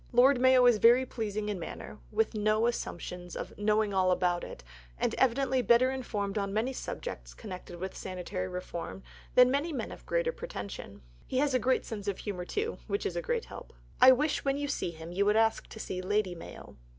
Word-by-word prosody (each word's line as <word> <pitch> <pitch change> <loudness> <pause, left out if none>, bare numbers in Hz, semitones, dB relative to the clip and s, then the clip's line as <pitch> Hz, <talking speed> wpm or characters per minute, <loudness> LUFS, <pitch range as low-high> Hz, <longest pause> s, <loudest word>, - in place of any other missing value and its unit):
Lord 250 +2 +5
Mayo 260 -1 +6
is 240 -3 +5
very 240 +4 +6
pleasing 215 -3 -3
in 205 -3 -2
manner, 165 - -7
with 445 - +1
no 215 +1 +2
assumption 180 -6 -3
of - - -5
"knowing 210 0 +1
all 185 -1 +3
about 180 -1 +1
it," - - -8 0.3
and - - 0
evidently 265 +1 +2
better 240 +3 +4
informed 210 -6 -2
on 200 -1 -2
many 225 +6 0
subjects - - -6
connected 185 -4 -8
with 190 +1 -5
sanitary 185 0 -4
reform 180 0 -6 0.3
than 250 0 +7
many 285 +5 0
men 255 -7 -4
of - - -11
greater - - +1
pretension. 470 - -7 0.2
He 255 - -2
has 280 0 +2
a 255 - +3
great 255 +3 +1
sense 210 -3 -6
of 200 - -1
humour, 185 -4 -5
too, 435 - -2
which 405 - -2
is - - -2
a - - -1
great 480 -2 -1
help. - - -10 0.3
I 255 +1 +10
wish, 290 +4 +1
when 275 0 +1
you 290 0 -2
see 280 - -2
him, 165 0 -9
you 190 +3 +1
would 210 +1 +4
ask 225 0 +2
to 220 - -10
see 185 -3 -4
Lady 200 0 0
Mayo. 170 - -11
220 Hz, 205 wpm, -30 LUFS, 190-260 Hz, 0.3 s, I